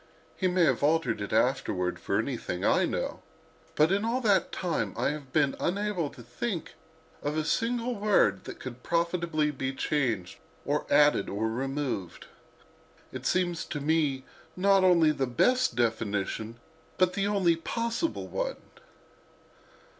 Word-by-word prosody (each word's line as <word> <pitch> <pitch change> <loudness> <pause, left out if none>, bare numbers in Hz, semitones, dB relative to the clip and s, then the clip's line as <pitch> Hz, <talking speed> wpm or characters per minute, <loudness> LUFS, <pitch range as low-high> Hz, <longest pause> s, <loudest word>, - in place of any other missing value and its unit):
He 185 - 0
may 180 -1 +2
have 135 -5 +1
altered 145 -7 +1
it 100 - -4
afterward, 100 -6 +1
for - - -1
anything - - -2
I - - +4
know, - - -3 0.5
but 155 +3 +4
in 200 +2 +1
all 230 +3 0
that 205 -5 +2
time 175 -3 -2
I - - +1
have 145 -3 -8
been 140 -1 +2
unable 195 -4 -1
to 135 -4 -13
think 170 - -4 0.5
of 150 +2 -2
a 155 - 0
single 235 +6 0
word 200 - +2
that - - -8
could 125 -1 -8
profitably 170 -3 0
be 135 -1 -4
changed 120 -12 -1 0.3
or 145 +1 -1
added 145 -7 +4
or 105 +3 -1
removed. 130 - -3 0.9
It 130 0 -4
seems 175 -2 0
to 150 - -4
me 145 -3 +1 0.3
not 195 +1 +4
only 170 -4 +5
the 135 -3 -1
best 250 - +2
definition, 110 -1 -1 0.4
but 185 -1 +3
the 195 +1 0
only 190 -5 +3
possible 230 - -2
one. - - -3
155 Hz, 145 wpm, -28 LUFS, 130-185 Hz, 0.9 s, only